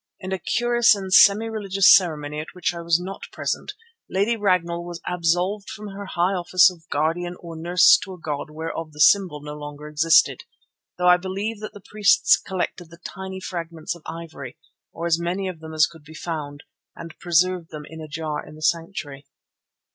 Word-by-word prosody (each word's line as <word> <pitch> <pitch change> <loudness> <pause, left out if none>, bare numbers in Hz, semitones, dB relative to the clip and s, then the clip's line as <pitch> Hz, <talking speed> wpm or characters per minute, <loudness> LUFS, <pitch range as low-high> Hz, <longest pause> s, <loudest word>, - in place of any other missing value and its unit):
In 185 - -7
a 190 - -2
curious 240 +4 +3
and 190 -2 -5
semi 205 +3 +7
religious 200 -4 +4
ceremony, 150 -5 0
at 155 - -8
which 180 -1 -1
I 170 - -6
was 170 0 +2
not 190 +2 -7
present, - - -3 0.4
Lady 200 +5 +1
Ragnall 180 -5 0
was 175 -1 -7
absolved 180 +4 0
from 210 -1 -8
her 200 0 -8
high 175 +3 +2
office 180 0 +4
of 165 -3 -18
Guardian 165 +4 -1
or 170 -1 -9
Nurse 175 +2 +5
to 190 - -8
a - - -17
god 150 -2 -4
whereof 160 0 -6
the 150 - -14
symbol 175 -2 +4
no 150 0 -7
longer 145 0 -8
existed, 155 +2 +3 0.6
though 180 - -1
I 180 0 +7
believe 195 +4 -4
that 215 - -7
the 205 - -13
priests 210 -1 +4
collected 180 -2 -4
the 170 - -14
tiny 190 +2 -7
fragments 170 -3 -5
of 170 - -14
ivory, 160 -6 -8 0.3
or 170 - -6
as 170 -1 +2
many 185 +3 -2
of 180 -3 -6
them 160 0 -9
as 155 0 +4
could 165 -3 -13
be 155 +1 -14
found, 150 -4 -6 0.3
and 165 -1 -9
preserved 175 0 +1
them 150 -1 -8
in 160 +1 -10
a 155 - -8
jar 155 0 -4
in - - -13
the 155 - -11
sanctuary. 160 -5 -2
170 Hz, 195 wpm, -23 LUFS, 160-190 Hz, 0.6 s, semi